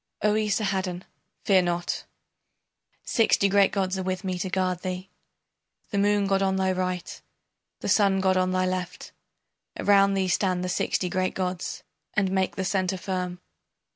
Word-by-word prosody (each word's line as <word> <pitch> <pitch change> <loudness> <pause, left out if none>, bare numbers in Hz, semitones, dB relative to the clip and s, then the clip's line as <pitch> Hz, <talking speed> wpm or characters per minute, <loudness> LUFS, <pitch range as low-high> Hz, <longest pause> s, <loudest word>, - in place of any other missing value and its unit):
O 210 0 +4
Esarhaddon, 195 -4 -1 0.4
fear 190 -2 +5
not. 175 -1 -2 1.0
Sixty 220 -3 +3
great 200 0 +4
gods 190 -1 -1
are - - -1
with 185 0 -3
me 185 -2 -2
to 190 - -2
guard 185 -1 -1
thee, 185 0 -5 0.8
The 200 - 0
Moon 205 0 +3
god 195 0 +1
on 190 -1 +1
thy 190 0 +1
right, 185 -1 -3 0.6
the - - -4
Sun 195 -2 +3
god 190 0 +2
on 185 0 +2
thy 185 0 +1
left, 185 -1 -4 0.7
Around 200 -1 +4
thee 190 -1 +1
stand 180 0 +1
the 180 - -2
sixty 180 +1 0
great 185 +1 -1
gods, 180 -1 -3 0.3
And 195 -2 +2
make 190 -1 0
the 190 - -2
centre 185 0 0
firm. 180 -1 -4
190 Hz, 160 wpm, -26 LUFS, 185-195 Hz, 1.0 s, fear